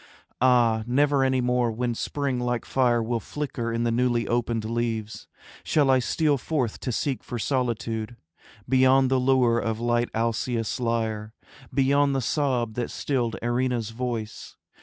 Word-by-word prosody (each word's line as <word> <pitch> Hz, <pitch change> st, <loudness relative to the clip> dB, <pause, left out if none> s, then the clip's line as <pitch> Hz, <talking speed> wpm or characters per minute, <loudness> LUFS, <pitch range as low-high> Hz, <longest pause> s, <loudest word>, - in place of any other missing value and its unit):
Ah, 120 Hz, -3 st, +4 dB
never 140 Hz, +2 st, +3 dB
any 130 Hz, -1 st, +2 dB
more 125 Hz, -1 st, +1 dB
when 120 Hz, +2 st, -2 dB
spring 135 Hz, +2 st, -2 dB
like 120 Hz, -1 st, -2 dB
fire 120 Hz, -3 st, +2 dB
Will 115 Hz, +1 st, -1 dB
flicker 125 Hz, -4 st, -4 dB
in 115 Hz, 0 st, -1 dB
the 120 Hz, -, +1 dB
newly 120 Hz, 0 st, +1 dB
opened 115 Hz, -2 st, -1 dB
leaves, 115 Hz, -1 st, -3 dB, 0.4 s
Shall 145 Hz, -3 st, +3 dB
I 130 Hz, -, +4 dB
steal 145 Hz, +2 st, +1 dB
forth 130 Hz, -6 st, -2 dB
to 125 Hz, -, -3 dB
seek 135 Hz, +3 st, -2 dB
for 120 Hz, -, -5 dB
solitude 115 Hz, -2 st, -2 dB, 0.5 s
Beyond 130 Hz, +1 st, +4 dB
the 130 Hz, -, +3 dB
lure 125 Hz, -2 st, +3 dB
of 115 Hz, -1 st, -2 dB
light 120 Hz, 0 st, +1 dB
Alcaeus' 115 Hz, 0 st, -1 dB
lyre, 110 Hz, -2 st, -2 dB, 0.4 s
Beyond 140 Hz, +1 st, +2 dB
the 135 Hz, -, 0 dB
sob 125 Hz, -4 st, 0 dB
that 120 Hz, +1 st, -3 dB
stilled 120 Hz, -5 st, -1 dB
Erinna's 120 Hz, -2 st, 0 dB
voice. 115 Hz, -2 st, -5 dB
120 Hz, 150 wpm, -25 LUFS, 115-130 Hz, 0.5 s, Ah